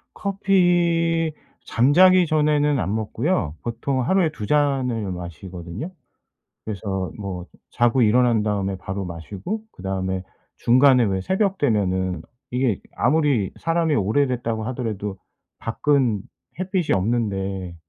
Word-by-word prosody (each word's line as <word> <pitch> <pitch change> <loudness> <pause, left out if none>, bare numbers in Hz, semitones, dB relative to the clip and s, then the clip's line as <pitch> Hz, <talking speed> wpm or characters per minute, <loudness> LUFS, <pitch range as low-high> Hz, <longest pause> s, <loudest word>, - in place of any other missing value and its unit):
커피 175 -5 +2 0.3
잠자기 180 +9 +5
전에는 150 -2 +2
안 95 +5 -1
먹고요. 110 - -1
보통 125 +3 -2
하루에 170 +3 +2
2 105 -8 -6
잔을 130 -8 +1
마시거든요. 90 - -7 0.7
그래서 95 -4 -3
뭐 95 -3 -5 0.3
자고 120 +1 +2
일어난 115 0 +4
다음에 100 -2 -1
바로 95 +1 -5
마시고 95 - -5
그다음에 95 -1 -3 0.3
중간에 130 0 +5
왜 95 -3 0
새벽 195 - 0
되면은 95 - 0 0.3
이게 125 -5 +1 0.2
아무리 135 - +2
사람이 165 -2 +1
오래됐다고 115 +1 0
하더라도 105 -6 -4 0.4
밖은 120 -3 +1 0.4
햇빛이 185 - 0
없는데 95 -4 -1
120 Hz, 265 characters per minute, -23 LUFS, 95-150 Hz, 0.7 s, 잠자기